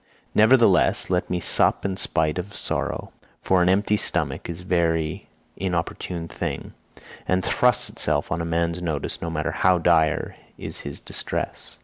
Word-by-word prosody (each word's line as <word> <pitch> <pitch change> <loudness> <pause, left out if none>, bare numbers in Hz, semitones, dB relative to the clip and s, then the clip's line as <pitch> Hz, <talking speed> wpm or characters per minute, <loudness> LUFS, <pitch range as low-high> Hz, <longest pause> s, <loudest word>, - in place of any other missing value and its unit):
Nevertheless, 110 -6 +4
let 90 -1 0
me 90 - -1
sup 90 - +3
in 95 -1 -1
spite 80 -3 0
of 100 +3 -7
sorrow, - - -2 0.3
for 95 -1 +3
an 90 - +3
empty 105 +2 +2
stomach 75 -8 -1
is 85 +1 -6
a - - -14
very 80 -3 0 0.3
importunate 85 -1 -3
thing, - - -4 0.5
and 95 0 +1
thrusts 125 -3 +2
itself - - 0
on 85 - -1
a - - -2
man's 85 +1 -1
notice 80 -5 -3
no 85 - -3
matter 75 -2 -2
how 90 0 +3
dire 80 -2 +2 0.2
is - - -5
his 70 - -6
distress. - - -3
85 Hz, 155 wpm, -24 LUFS, 80-95 Hz, 0.5 s, Nevertheless